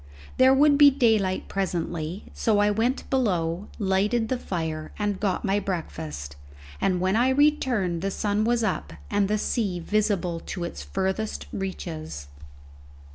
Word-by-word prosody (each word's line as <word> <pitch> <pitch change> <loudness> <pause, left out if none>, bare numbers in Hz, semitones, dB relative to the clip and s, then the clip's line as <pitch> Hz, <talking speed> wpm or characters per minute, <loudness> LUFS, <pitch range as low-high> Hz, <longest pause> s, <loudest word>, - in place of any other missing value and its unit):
There 260 +1 +6
would 285 +1 +5
be 290 -1 +10
daylight 220 -8 +1
presently, 175 -2 -3
so 220 -2 +1
I 205 0 +4
went 230 +5 0
below, 185 -8 0
lighted 210 +3 +1
the 255 - 0
fire, 160 -6 -4
and 205 -2 -1
got 200 -1 -1
my 200 +1 +2
breakfast, 75 - -5 0.5
and 185 -2 +2
when 185 +3 +1
I 245 +3 +3
returned 260 - +2
the 195 - -1
sun 205 +1 0
was 235 +1 +1
up 80 - -2 0.2
and 200 -1 +2
the 210 +1 +1
sea 205 -4 -1
visible 195 -3 0
to 175 +1 -6
its 170 - -5
furthest 190 - -2
reaches. 160 - -5
195 Hz, 145 wpm, -25 LUFS, 175-225 Hz, 0.5 s, be